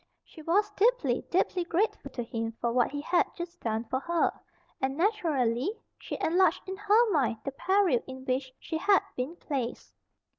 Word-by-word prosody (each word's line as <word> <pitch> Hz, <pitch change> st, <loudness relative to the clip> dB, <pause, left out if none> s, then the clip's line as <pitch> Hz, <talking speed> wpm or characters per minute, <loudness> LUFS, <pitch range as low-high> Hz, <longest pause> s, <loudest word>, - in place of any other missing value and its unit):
She 320 Hz, -, -13 dB
was 400 Hz, +7 st, +2 dB
deeply, 395 Hz, -, +2 dB
deeply 360 Hz, 0 st, +1 dB
grateful 355 Hz, +6 st, -1 dB
to 240 Hz, -, -4 dB
him 225 Hz, 0 st, -3 dB
for 235 Hz, -1 st, 0 dB
what 245 Hz, -1 st, +3 dB
he 290 Hz, +1 st, -4 dB
had 345 Hz, +4 st, +2 dB
just 345 Hz, 0 st, -6 dB
done 225 Hz, 0 st, -1 dB
for 260 Hz, +3 st, -2 dB
her, 340 Hz, +4 st, +1 dB, 0.5 s
and, 265 Hz, +1 st, -1 dB
naturally, 325 Hz, -, +1 dB, 0.3 s
she -, -, -5 dB
enlarged 360 Hz, +4 st, +2 dB
in 380 Hz, -, -3 dB
her 425 Hz, +3 st, +3 dB
mind 265 Hz, -, +2 dB
the 275 Hz, -, -2 dB
peril 370 Hz, -2 st, +2 dB
in 260 Hz, 0 st, -8 dB
which 260 Hz, 0 st, -1 dB
she 320 Hz, -, -4 dB
had 395 Hz, +2 st, +4 dB
been 260 Hz, +7 st, -3 dB
placed. 265 Hz, -8 st, -4 dB
320 Hz, 175 wpm, -29 LUFS, 255-380 Hz, 0.5 s, had